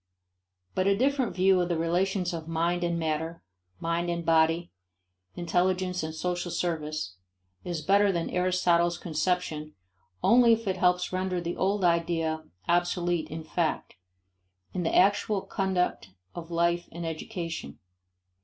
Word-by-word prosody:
But 185 Hz, +1 st, +1 dB
a 200 Hz, 0 st, +3 dB
different 265 Hz, -1 st, +1 dB
view 185 Hz, 0 st, +4 dB
of 175 Hz, -, -1 dB
the 170 Hz, -, 0 dB
relations 180 Hz, +2 st, 0 dB
of 165 Hz, -1 st, -5 dB
mind 170 Hz, +2 st, 0 dB
and 170 Hz, -1 st, 0 dB
matter, 160 Hz, +1 st, -2 dB, 0.4 s
mind 170 Hz, +1 st, -1 dB
and 170 Hz, -1 st, -2 dB
body, 165 Hz, +1 st, +3 dB, 0.6 s
intelligence 180 Hz, +1 st, 0 dB
and 160 Hz, 0 st, -4 dB
social 175 Hz, +2 st, -2 dB
service, 155 Hz, -, -3 dB, 0.5 s
is 170 Hz, -3 st, -4 dB
better 200 Hz, +1 st, +4 dB
than 170 Hz, -2 st, -1 dB
Aristotle's 180 Hz, -1 st, +2 dB
conception 160 Hz, -2 st, -2 dB, 0.5 s
only 235 Hz, 0 st, +6 dB
if 225 Hz, -1 st, -2 dB
it 190 Hz, -1 st, 0 dB
helps 180 Hz, 0 st, +2 dB
render 185 Hz, -1 st, -1 dB
the 170 Hz, 0 st, -3 dB
old 195 Hz, +1 st, 0 dB
idea 165 Hz, -2 st, +1 dB, 0.2 s
obsolete 175 Hz, -1 st, +1 dB
in 160 Hz, +1 st, -6 dB
fact 160 Hz, 0 st, -2 dB, 0.8 s
in 185 Hz, -, -2 dB
the 165 Hz, -, 0 dB
actual 200 Hz, +1 st, +3 dB
conduct 185 Hz, -, -1 dB, 0.2 s
of 170 Hz, -1 st, -8 dB
life 170 Hz, +1 st, +1 dB
and 170 Hz, +1 st, -6 dB
education. 165 Hz, -, -5 dB
175 Hz, 135 wpm, -28 LUFS, 165-185 Hz, 0.8 s, only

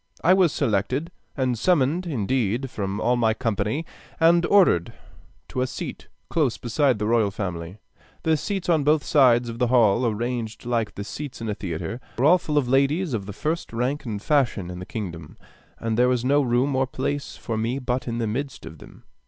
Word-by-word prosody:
I 180 Hz, -, +6 dB
was 185 Hz, -4 st, +4 dB
selected, 130 Hz, -, -1 dB, 0.3 s
and 125 Hz, -4 st, 0 dB
summoned 170 Hz, +3 st, +2 dB
indeed, 125 Hz, -, -1 dB
from 100 Hz, 0 st, -3 dB
all 125 Hz, +3 st, +2 dB
my 110 Hz, -2 st, +2 dB
company, 115 Hz, +5 st, -1 dB, 0.3 s
and 170 Hz, +1 st, +5 dB
ordered 180 Hz, -, +4 dB, 0.6 s
to 130 Hz, -, -2 dB
a 130 Hz, -, +1 dB
seat -, -, -7 dB, 0.2 s
close 145 Hz, -8 st, 0 dB
beside 125 Hz, +1 st, +1 dB
the 105 Hz, -, -2 dB
royal 110 Hz, -2 st, +3 dB
family. 90 Hz, -2 st, -5 dB, 0.5 s
The 160 Hz, 0 st, +3 dB
seats 195 Hz, +5 st, -3 dB
on 160 Hz, -4 st, +3 dB
both 150 Hz, +1 st, +3 dB
sides 125 Hz, -4 st, +4 dB
of 115 Hz, 0 st, -6 dB
the 125 Hz, -, +2 dB
hall, 115 Hz, -2 st, +4 dB
arranged 115 Hz, 0 st, -3 dB
like 115 Hz, -3 st, -1 dB
the 100 Hz, -, -5 dB
seats 130 Hz, +6 st, -7 dB
in 115 Hz, -1 st, -4 dB
a -, -, 0 dB
theatre, 95 Hz, +6 st, -5 dB, 0.2 s
were 125 Hz, -, +2 dB
all 180 Hz, +4 st, +6 dB
full 150 Hz, -3 st, -2 dB
of 140 Hz, -4 st, +2 dB
ladies 140 Hz, +5 st, +2 dB
of 100 Hz, -4 st, -3 dB
the -, -, -5 dB
first 155 Hz, -, -3 dB
rank 125 Hz, +6 st, -1 dB
and 110 Hz, -6 st, -4 dB
fashion 120 Hz, -, +1 dB
in 90 Hz, -, -7 dB
the 90 Hz, -, -8 dB
kingdom, 85 Hz, -8 st, -6 dB, 0.4 s
and 115 Hz, 0 st, -2 dB
there 125 Hz, 0 st, +5 dB
was 125 Hz, -1 st, 0 dB
no 145 Hz, +2 st, +4 dB
room 130 Hz, +2 st, +1 dB
or 130 Hz, 0 st, +1 dB
place 140 Hz, +2 st, -3 dB
for 115 Hz, -, -4 dB
me 115 Hz, +4 st, -1 dB
but 125 Hz, -1 st, -2 dB
in 115 Hz, -1 st, -2 dB
the 115 Hz, -, -1 dB
midst 130 Hz, +5 st, -4 dB
of 80 Hz, -1 st, -10 dB
them. -, -, -15 dB
125 Hz, 200 wpm, -24 LUFS, 110-145 Hz, 0.6 s, I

